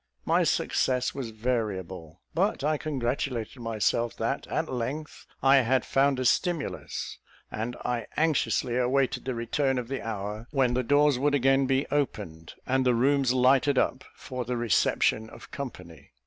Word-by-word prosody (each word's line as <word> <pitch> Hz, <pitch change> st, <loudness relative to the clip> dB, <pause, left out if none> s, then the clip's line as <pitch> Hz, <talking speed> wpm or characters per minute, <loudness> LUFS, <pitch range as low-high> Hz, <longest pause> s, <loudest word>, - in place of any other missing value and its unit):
My -, -, +3 dB
success 125 Hz, -1 st, +1 dB
was 135 Hz, -4 st, -5 dB
variable; 95 Hz, -8 st, -3 dB
but 190 Hz, -1 st, 0 dB
I 155 Hz, +1 st, +1 dB
congratulated 125 Hz, -4 st, -3 dB
myself 115 Hz, +1 st, 0 dB
that -, -, -2 dB
at -, -, -1 dB
length 140 Hz, +5 st, -5 dB, 0.2 s
I 135 Hz, +1 st, +6 dB
had 130 Hz, 0 st, +2 dB
found 135 Hz, -1 st, +2 dB
a 130 Hz, -, -1 dB
stimulus; 170 Hz, +3 st, -1 dB, 0.3 s
and 115 Hz, +3 st, -4 dB
I 120 Hz, -3 st, -2 dB
anxiously 150 Hz, -5 st, +1 dB
awaited 130 Hz, +1 st, +1 dB
the 130 Hz, -2 st, -2 dB
return 130 Hz, +3 st, 0 dB
of 125 Hz, -1 st, -4 dB
the 135 Hz, -, -3 dB
hour 105 Hz, +1 st, -5 dB
when 135 Hz, -4 st, +2 dB
the 125 Hz, -, +1 dB
doors 145 Hz, +1 st, +3 dB
would 145 Hz, +1 st, +2 dB
again 135 Hz, 0 st, +3 dB
be 135 Hz, +1 st, +1 dB
opened, 100 Hz, -, -3 dB
and 130 Hz, 0 st, +1 dB
the 125 Hz, -2 st, +3 dB
rooms 135 Hz, +1 st, +3 dB
lighted 130 Hz, +2 st, +3 dB
up 130 Hz, -, +1 dB
for 125 Hz, -2 st, -5 dB
the 125 Hz, +1 st, -3 dB
reception 110 Hz, -1 st, +1 dB
of -, -, -13 dB
company. 85 Hz, -, -8 dB
125 Hz, 155 wpm, -27 LUFS, 115-140 Hz, 0.3 s, I